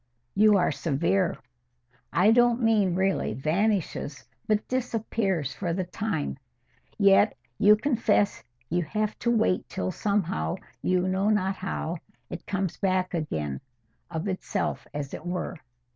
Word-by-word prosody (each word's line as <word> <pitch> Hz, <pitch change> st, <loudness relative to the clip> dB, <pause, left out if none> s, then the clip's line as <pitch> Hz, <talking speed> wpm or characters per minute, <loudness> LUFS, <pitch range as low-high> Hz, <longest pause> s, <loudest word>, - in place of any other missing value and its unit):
"You 210 Hz, 0 st, +5 dB
are 180 Hz, -, +2 dB
severe." 170 Hz, +4 st, 0 dB, 0.7 s
"I 180 Hz, +8 st, +5 dB
don't 240 Hz, 0 st, +4 dB
mean 215 Hz, -6 st, +3 dB
really 190 Hz, -, 0 dB
vanishes, 160 Hz, -, -1 dB, 0.2 s
but 215 Hz, 0 st, +1 dB
disappears 220 Hz, -, -1 dB
for 175 Hz, -4 st, -2 dB
the 185 Hz, +2 st, -1 dB
time. 180 Hz, -6 st, -3 dB, 0.6 s
Yet 200 Hz, +1 st, +5 dB, 0.2 s
you 210 Hz, +1 st, +7 dB
will 215 Hz, -, 0 dB
confess 215 Hz, -, +1 dB, 0.2 s
you 175 Hz, +2 st, 0 dB
have 210 Hz, +6 st, -2 dB
to 235 Hz, -, 0 dB
wait 220 Hz, -5 st, +2 dB
till, 185 Hz, -, -2 dB
somehow, 180 Hz, -, -1 dB, 0.3 s
you 185 Hz, 0 st, +1 dB
know 190 Hz, +2 st, +1 dB
not 195 Hz, -2 st, +1 dB
how, 175 Hz, -2 st, -3 dB, 0.3 s
it -, -, -7 dB
comes 195 Hz, -3 st, -2 dB
back 185 Hz, -2 st, 0 dB
again—of 125 Hz, -, -5 dB
itself, 190 Hz, +1 st, -2 dB
as 145 Hz, -1 st, -5 dB
it -, -, -6 dB
were." 180 Hz, 0 st, -3 dB
190 Hz, 130 wpm, -27 LUFS, 165-210 Hz, 0.7 s, you